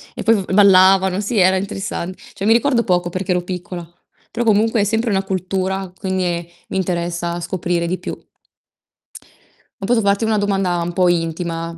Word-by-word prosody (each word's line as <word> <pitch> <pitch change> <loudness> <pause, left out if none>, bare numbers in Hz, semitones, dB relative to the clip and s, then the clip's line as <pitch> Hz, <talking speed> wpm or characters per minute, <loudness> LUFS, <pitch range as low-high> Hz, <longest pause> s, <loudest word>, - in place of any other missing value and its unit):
E - - -5
poi 225 0 +4
v 190 -2 -3
ballavano, 190 -1 +5
sì, 210 +3 -2
era 185 0 +4
interessan 195 -2 -4 0.2
cioè, 200 -1 -5
mi 220 - +5
ricordo 240 0 +2
poco 180 -3 +1
perché 185 +2 -3
ero 180 0 +1
piccola, 180 -1 -6 0.4
però 235 +1 -2
comunque 220 +1 +3
è - - +3
sempre 225 +3 0
una 195 -2 +1
cultura, 190 0 -2
quindi 190 -1 -2
è 170 -1 -2 0.2
mi - - -3
interessa 175 -1 -2
scoprire 175 0 -2
di 185 +2 -1
più. - - -6 1.6
Ma 195 - -3
posso 240 0 +3
farti 200 +1 +1
una 220 -1 +1
domanda 195 -3 0
un 170 +1 -3
po' 180 0 +3
intima? 165 0 -2
190 Hz, 180 wpm, -19 LUFS, 175-200 Hz, 1.6 s, ballavano